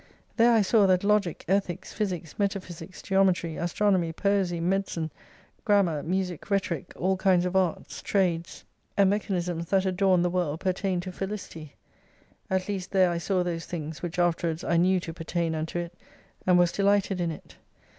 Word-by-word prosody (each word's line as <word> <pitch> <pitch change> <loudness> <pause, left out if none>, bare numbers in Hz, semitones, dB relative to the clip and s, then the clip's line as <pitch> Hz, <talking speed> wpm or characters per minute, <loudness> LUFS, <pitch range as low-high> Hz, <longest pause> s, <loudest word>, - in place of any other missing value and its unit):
There 235 +1 +5
I 225 -3 +4
saw 200 0 +4
that 185 0 +3
Logic, 205 -4 +1
Ethics, 190 -2 -1
Physics, 180 -7 -4
Metaphysics, 190 -3 -4
Geometry, 185 -4 +2
Astronomy, 175 0 +1
Poesy, 190 -1 0
Medicine, 175 -3 -1 0.5
Grammar, 195 -9 +2
Music, 180 +1 -3
Rhetoric 190 -4 -1
all 190 +1 +1
kinds 185 -2 +3
of 180 +1 -2
Arts, 185 -3 -1
Trades, 175 -4 -1
i86 - - -36 0.3
and 200 -1 +5
Mechanisms 180 -5 -2
that 195 -1 +2
adorned 185 -1 +3
the 175 - +1
world 170 -4 -1
pertained 185 -1 -1
to 185 - -6
felicity; 185 -6 -6 0.7
at 190 -1 0
least 195 -3 -3
there 185 -2 +3
I 170 - -1
saw 185 +1 0
those 170 -2 -4
things, 160 -2 -5
which 175 -1 -5
after 175 -1 +1
wards 160 0 -3
I 170 - 0
knew 185 +2 +3
to 165 -1 -7
pertain 165 0 -2
unto 160 +2 -3
it: 175 0 -4 0.5
and 180 -1 +6
was 175 -1 +4
delighted 200 -2 +1
in 170 - 0
it. 160 - -9
180 Hz, 170 wpm, -27 LUFS, 170-195 Hz, 0.7 s, and